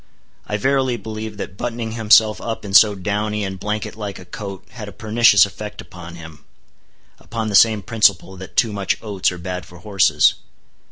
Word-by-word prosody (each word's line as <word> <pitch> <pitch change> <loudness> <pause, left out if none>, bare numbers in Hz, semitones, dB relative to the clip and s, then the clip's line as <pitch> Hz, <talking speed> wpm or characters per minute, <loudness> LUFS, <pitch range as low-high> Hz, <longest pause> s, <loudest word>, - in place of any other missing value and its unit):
I 105 - -2
verily 130 +1 +1
believe 110 -1 -7
that 95 -1 -7
buttoning 115 -1 -4
himself 110 -2 +4
up 115 -2 -5
in 100 - -7
so 105 0 +7
downy 105 +2 -2
and 95 -1 -5
blanket 105 +2 -4
like 105 -3 -6
a 90 - -12
coat 100 +1 -8
had 115 -3 -8
a - - -8
pernicious 110 -3 +4
effect 105 +1 -9
upon 85 -1 -10
him; 80 -3 -12 0.8
upon 115 -1 -4
the 105 - -1
same 110 -1 +5
principle 100 -3 +1
that 95 0 -11
too 110 -3 +2
much 100 -2 -1
oats 100 -4 0
are 90 - -7
bad 90 +1 -5
for 90 - -15
horses. 100 +2 +3
105 Hz, 180 wpm, -20 LUFS, 95-110 Hz, 0.8 s, so